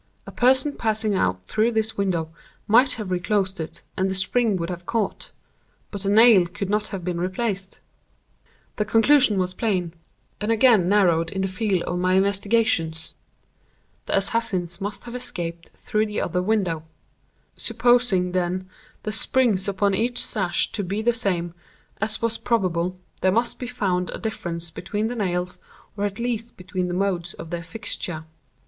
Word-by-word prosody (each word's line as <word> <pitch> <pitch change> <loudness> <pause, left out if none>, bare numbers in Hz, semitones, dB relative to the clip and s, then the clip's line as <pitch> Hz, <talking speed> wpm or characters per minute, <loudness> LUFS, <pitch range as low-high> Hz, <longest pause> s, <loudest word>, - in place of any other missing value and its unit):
A - - -9
person 260 +4 +3
passing 220 -3 0
out 90 - 0
through 220 - +1
this 220 0 +2
window 175 -5 -1 0.4
might 250 +4 +5
have 210 -4 -5
reclosed 190 +1 0
it, 160 - -6
and 190 0 0
the 190 - -1
spring 215 +3 +2
would 170 0 -3
have 175 0 -8
caught—but 205 -2 -6
the 195 - -1
nail 215 -4 +7
could 195 +2 -4
not 210 0 +1
have 190 -3 -5
been 175 -1 -2
replaced. 190 +1 -2 1.0
The 210 - +2
conclusion 225 0 +5
was 185 -1 0
plain, 185 -5 -1 0.5
and 210 +2 -1
again 225 -6 +5
narrowed 175 -5 +3
in 190 +2 -2
the - - +1
field 190 -1 -1
of 180 - -2
my 185 +1 +2
investigations. 195 -5 +1 0.9
The - - +2
assassins 195 -4 -1
must 205 +1 -4
have 240 - -9
escaped 170 -9 -5
through 215 +1 -1
the 210 - -2
other 180 +1 -1
window. 185 -5 0 0.7
Supposing, 230 -6 +3
then, 185 +1 -1 0.4
the 215 - -2
springs 220 -3 +2
upon 200 0 +1
each 240 +5 0
sash 195 -6 +1
to 205 - -2
be 200 +4 -2
the 240 +1 +3
same, 175 -7 -1 0.5
as 215 +1 -1
was 230 0 0
probable, 185 -5 0 0.2
there 185 - +3
must 230 +4 0
be 250 - -4
found 190 -7 -1
a - - -5
difference 170 -7 -4
between 215 +1 -3
the 245 - -4
nails, 180 -4 -1 0.4
or 205 0 -1
at 200 0 -3
least 235 -1 -3
between 185 0 -3
the 175 - -3
modes 180 -3 -1
of 165 - -9
their 170 -1 -3
fixture. 175 -5 -4
195 Hz, 165 wpm, -24 LUFS, 180-220 Hz, 1.0 s, nail